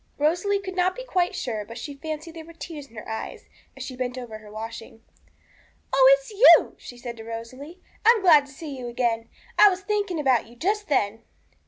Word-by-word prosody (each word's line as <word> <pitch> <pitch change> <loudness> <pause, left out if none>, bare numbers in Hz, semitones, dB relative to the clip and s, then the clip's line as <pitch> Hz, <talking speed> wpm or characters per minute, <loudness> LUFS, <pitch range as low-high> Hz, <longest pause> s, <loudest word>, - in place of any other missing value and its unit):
Rosalie 350 +7 +1
could 380 -1 -7
not 370 0 +1
be - - -7
quite 370 -6 0
sure, 230 - -3
but 230 +3 -10
she 290 - -6
fancied 310 +3 -6
there 325 -1 -9
were 335 +1 -14
tears 320 -3 -8
in 230 - -21
her 215 - -9
eyes 220 0 -6 0.3
as - - -6
she 255 - -7
bent 250 0 -3
over 230 -4 -7
her 215 -1 -14
washing. 225 +1 -8 0.9
'Oh, 270 0 +7
it's 275 +6 -13
you!' 425 +4 +7
she 245 - -11
said 240 -1 -7
to 225 - -9
Rosalie. 255 +9 -8 0.2
'I 440 - +6
am - - -5
glad 305 -6 +6
to - - -15
see 285 +1 -8
you 250 -2 -6
again; 235 -1 -1 0.3
I 415 - +9
was 375 0 -3
thinking 405 -4 -1
about 260 -6 +2
you 235 - -16
just 410 - -1
then.' 225 -5 0
275 Hz, 215 wpm, -25 LUFS, 235-355 Hz, 0.9 s, I